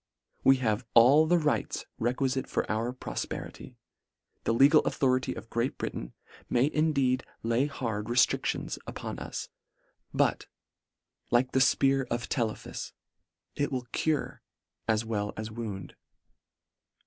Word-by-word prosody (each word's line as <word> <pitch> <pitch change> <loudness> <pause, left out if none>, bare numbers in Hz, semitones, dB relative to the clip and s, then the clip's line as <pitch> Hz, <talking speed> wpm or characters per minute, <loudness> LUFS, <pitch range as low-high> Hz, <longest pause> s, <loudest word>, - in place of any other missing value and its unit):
We 135 - +7
have 115 -3 0
all 135 +7 +7
the 175 +2 +4
rights 150 -3 -1
requilite 130 +3 0
for - - -1
our 115 +3 0
profperity. 125 - -6 0.7
The - - +2
legal 140 +5 +7
authority 130 -1 +1
of 115 - -10
Great 120 +3 -1
Britain - - -5 0.4
may 130 +5 +2
indeed 140 -5 +2 0.2
lay 115 +5 +2
hard 115 -7 -3
reftricli 120 +1 +2
ons - - -5
upon - - -6
us; - - -6 0.6
but, - - +1 0.8
like 125 +2 +2
the 130 - +2
fpear 135 0 +3
of 120 0 -2
Tele 115 -5 0
phus, - - -8 0.6
it 145 - -1
will 130 -2 -2
cure 155 -2 -1 0.5
as 110 0 +1
well 105 -2 -2
as 110 0 -5
wound. 110 -4 -6
125 Hz, 130 wpm, -29 LUFS, 115-135 Hz, 0.8 s, We